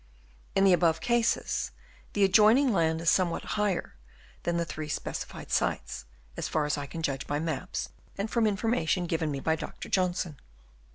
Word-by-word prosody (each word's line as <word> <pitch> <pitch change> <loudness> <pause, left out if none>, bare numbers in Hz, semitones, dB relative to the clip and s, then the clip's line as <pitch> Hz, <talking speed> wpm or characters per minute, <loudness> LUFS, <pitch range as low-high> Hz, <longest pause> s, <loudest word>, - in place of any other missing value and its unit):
In 195 - +4
the 195 -2 +6
above 165 -2 +3
cases 235 +4 +1 0.4
the 205 - +2
adjoining 220 +7 +6
land 160 -2 +2
is 165 - +3
somewhat 180 -3 +1
higher 210 -4 0 0.5
than 170 0 0
the 170 - 0
three 155 -1 -5
speci - - -3
fied - - -10
sites, - - -1 0.3
as - - -3
far 155 -1 0
as 150 - 0
I 145 -1 -5
can 165 +4 -6
judge 140 -2 -2
by 145 - 0
maps 135 - -3 0.3
and 200 +2 -1
from 225 0 +2
information 200 -4 +1
given 165 -2 -1
me 140 -2 -2
by 160 +3 +1
Dr. - - -7
Johnson. 180 -4 0
170 Hz, 175 wpm, -29 LUFS, 155-200 Hz, 0.5 s, the